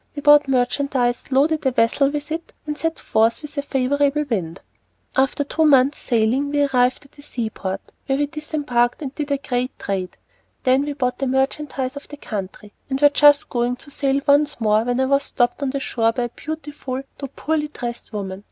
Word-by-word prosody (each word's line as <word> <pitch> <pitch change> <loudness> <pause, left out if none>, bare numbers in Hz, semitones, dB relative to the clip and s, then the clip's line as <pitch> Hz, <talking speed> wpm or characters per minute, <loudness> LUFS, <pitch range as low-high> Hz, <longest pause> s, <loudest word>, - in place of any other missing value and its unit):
We 290 - -6
bought 295 -1 +7
merchandise, 255 -1 0
loaded 300 +4 +2
a 265 - +3
vessel 255 +3 +2
with 295 +1 -5
it, 330 +1 -5
and 300 -1 -3
set 325 +2 -2
forth 225 +5 +1
with 300 - -7
a 285 - 0
favorable 285 +2 +1
wind. 185 -8 -3 0.5
After 270 +1 +2
two 315 +3 0
months' 280 -2 +4
sailing 240 +4 +1
we 290 0 +2
arrived 255 -1 +1
at 280 - -21
a - - -10
seaport, 220 -8 -5 0.2
where 270 - +1
we 290 - +2
disembarked 290 -5 -1
and 270 -1 -5
did 295 0 -4
a 280 - +1
great 255 -1 -3
trade. 190 -2 -4 0.5
Then 260 +1 +4
we 290 - -3
bought 250 -3 -2
the 270 - 0
merchandise 265 0 -1
of 285 - -9
the 290 - -10
country, 205 -4 -6 0.2
and 265 0 -1
were 290 0 +7
just 290 0 +5
going 240 0 0
to 285 +3 -15
sail 275 0 +1
once 290 0 +3
more, 215 0 +2
when 245 +1 0
I 265 - +3
was 275 +1 +3
stopped 245 -1 0
on 280 - 0
the 275 +1 -2
shore 230 -4 +1
by 245 +2 -2
a 240 - -2
beautiful 290 -2 -6 0.2
though 275 - -4
poorly 305 -1 -1
dressed 240 -6 -7
woman. 195 -3 -5
270 Hz, 200 wpm, -21 LUFS, 245-290 Hz, 0.5 s, bought